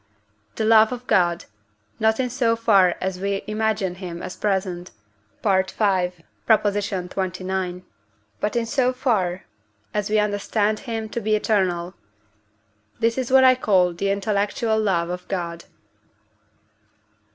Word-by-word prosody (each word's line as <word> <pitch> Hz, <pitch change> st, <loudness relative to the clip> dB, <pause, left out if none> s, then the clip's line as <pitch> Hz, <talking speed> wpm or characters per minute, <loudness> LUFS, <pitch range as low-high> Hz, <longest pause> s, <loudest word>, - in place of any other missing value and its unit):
the 220 Hz, -, -1 dB
love 220 Hz, 0 st, +6 dB
of 250 Hz, 0 st, -6 dB
God; 175 Hz, -6 st, +2 dB, 0.5 s
not 220 Hz, +1 st, +2 dB
in 250 Hz, -2 st, -1 dB
so 235 Hz, -3 st, +1 dB
far 200 Hz, -6 st, +4 dB
as 185 Hz, -1 st, -3 dB
we 195 Hz, 0 st, -2 dB
imagine 215 Hz, -3 st, -1 dB
him 180 Hz, -2 st, -7 dB
as -, -, -6 dB
present 185 Hz, -3 st, -2 dB, 0.5 s
(V. 215 Hz, -, +1 dB
xxix.), 190 Hz, -1 st, -1 dB, 0.6 s
but 210 Hz, -, -2 dB
in 235 Hz, -1 st, +1 dB
so 255 Hz, +1 st, +1 dB
far 190 Hz, -8 st, 0 dB, 0.5 s
as 210 Hz, -1 st, -1 dB
we 215 Hz, -, +2 dB
understand 210 Hz, +1 st, 0 dB
him 225 Hz, -3 st, -4 dB
to 235 Hz, +2 st, -4 dB
be 215 Hz, 0 st, +1 dB
eternal; 185 Hz, -5 st, 0 dB, 1.1 s
this 230 Hz, 0 st, +1 dB
is 260 Hz, -2 st, -2 dB
what 265 Hz, 0 st, +7 dB
I 260 Hz, 0 st, +7 dB
call 190 Hz, -8 st, +2 dB
the 195 Hz, +4 st, -2 dB
intellectual 205 Hz, +2 st, 0 dB
love 175 Hz, -5 st, 0 dB
of 180 Hz, 0 st, -6 dB
God. 170 Hz, -3 st, -4 dB
200 Hz, 130 wpm, -23 LUFS, 185-220 Hz, 1.1 s, what